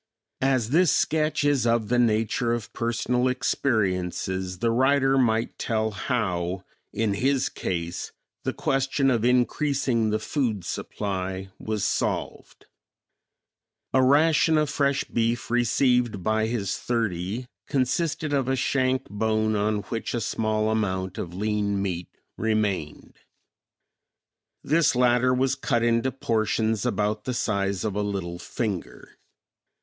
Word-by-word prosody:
As 130 -4 +1
this 175 +3 +4
sketch 155 -1 +1
is 145 -4 +2
of 115 -2 +1
the 125 0 +2
nature 115 +1 +1
of 120 -3 -5
personal 120 +2 0
experiences, 95 -7 -1
the 115 +4 +1
writer 135 +2 +3
might 115 -3 +1
tell 110 -1 0
how, 95 -5 -2 0.3
in 110 -2 0
his 135 +5 +1
case, 85 0 -4 0.3
the - - 0
question 135 0 +1
of 115 -3 +1
increasing 125 -1 +1
the 105 - +1
food 110 - -2
supply 95 -1 -4
was 110 -2 -3
solved. - - -3 1.3
A 130 - +5
ration 155 +4 +4
of 150 -1 +1
fresh 140 -1 +1
beef 115 +1 -1
received 120 -3 +2
by 110 +1 +1
his 110 -5 -2
thirty 110 -1 -2 0.2
consisted 145 +3 0
of 135 -3 +1
a 135 - +1
shank 130 0 0
bone 110 +1 0
on 105 0 0
which 115 +4 -4
a 120 - -1
small 110 0 0
amount 95 -4 -1
of 85 0 -5
lean 105 0 0
meat 90 -3 -3 0.3
remained. 105 -8 -1 1.5
This 155 -2 +3
latter 125 0 +3
was 130 +1 +2
cut 125 -3 0
into 115 +2 +2
portions 110 -2 0
about 105 -1 -1
the 125 - -2
size 100 -4 -1
of 105 -3 -2
a 105 - 0
little 95 -4 -3
finger. 105 -4 -5
115 Hz, 125 wpm, -25 LUFS, 105-130 Hz, 1.5 s, A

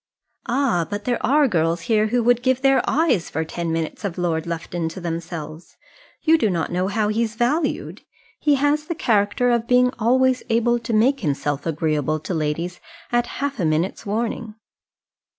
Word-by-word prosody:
"Ah! 240 - +1
but 205 0 -5
there 245 -1 -1
are 290 +2 +4
girls 165 -4 0
here 215 +2 +2
who 240 +2 +1
would 245 +1 +3
give 260 +1 +1
their 270 -2 +4
eyes 290 - +1
for 160 - -2
ten 170 +1 -4
minutes 165 +5 -3
of 190 -4 -3
Lord 170 -2 -1
Lufton 170 0 -3
to 175 - -8
themselves. 165 -2 -6 0.5
You 320 0 +4
do 220 - +2
not 170 -4 -1
know 180 +2 0
how 210 +1 0
he's 225 +1 -1
valued. 285 +7 -1 0.4
He 295 -1 +3
has 290 +2 +1
the 340 - -3
character 220 -2 +2
of 235 -1 0
being 250 0 +4
always 255 +3 +3
able 240 +1 +2
to 230 0 -5
make 245 +6 +3
himself 145 -2 -2
agreeable 155 -1 0
to 180 - -4
ladies 165 +3 -2 0.3
at 240 0 +1
half 280 -2 -3
a - - 0
minute's 160 +4 0
warning." 225 +1 -3
215 Hz, 175 wpm, -22 LUFS, 165-250 Hz, 0.5 s, are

